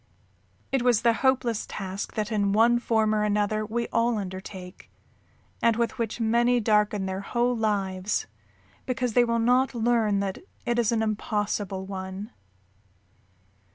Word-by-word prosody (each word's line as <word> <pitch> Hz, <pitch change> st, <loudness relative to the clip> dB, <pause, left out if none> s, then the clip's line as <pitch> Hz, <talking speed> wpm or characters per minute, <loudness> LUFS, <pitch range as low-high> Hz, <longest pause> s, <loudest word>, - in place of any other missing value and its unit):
"_] -, -, -38 dB, 0.7 s
It 270 Hz, -, +1 dB
was 240 Hz, -3 st, +3 dB
the 235 Hz, -, +5 dB
hopeless 250 Hz, -4 st, +1 dB
task 195 Hz, 0 st, -5 dB
that 215 Hz, 0 st, -2 dB
in 200 Hz, -2 st, +1 dB
one 235 Hz, +3 st, +4 dB
form 220 Hz, -2 st, +1 dB
or 215 Hz, -, +1 dB
another 210 Hz, 0 st, +1 dB
we 235 Hz, +2 st, -2 dB
all 230 Hz, 0 st, +1 dB
undertake, 185 Hz, -1 st, -8 dB, 0.7 s
and 230 Hz, -1 st, +4 dB
with 235 Hz, +1 st, -1 dB
which 230 Hz, 0 st, -2 dB
many 235 Hz, +2 st, +3 dB
darken 210 Hz, -2 st, +2 dB
their 190 Hz, 0 st, -3 dB
whole 240 Hz, +4 st, 0 dB
lives 200 Hz, -3 st, -1 dB, 0.6 s
because 250 Hz, -2 st, -1 dB
they 245 Hz, -, +5 dB
will 235 Hz, -1 st, 0 dB
not 250 Hz, +3 st, +2 dB
learn 225 Hz, -3 st, +2 dB
that 195 Hz, -1 st, -3 dB, 0.3 s
it 240 Hz, 0 st, +1 dB
is 230 Hz, -2 st, +2 dB
an 225 Hz, -1 st, +1 dB
impossible 205 Hz, -2 st, -2 dB
one. 190 Hz, +2 st, -6 dB
215 Hz, 150 wpm, -26 LUFS, 200-235 Hz, 0.7 s, the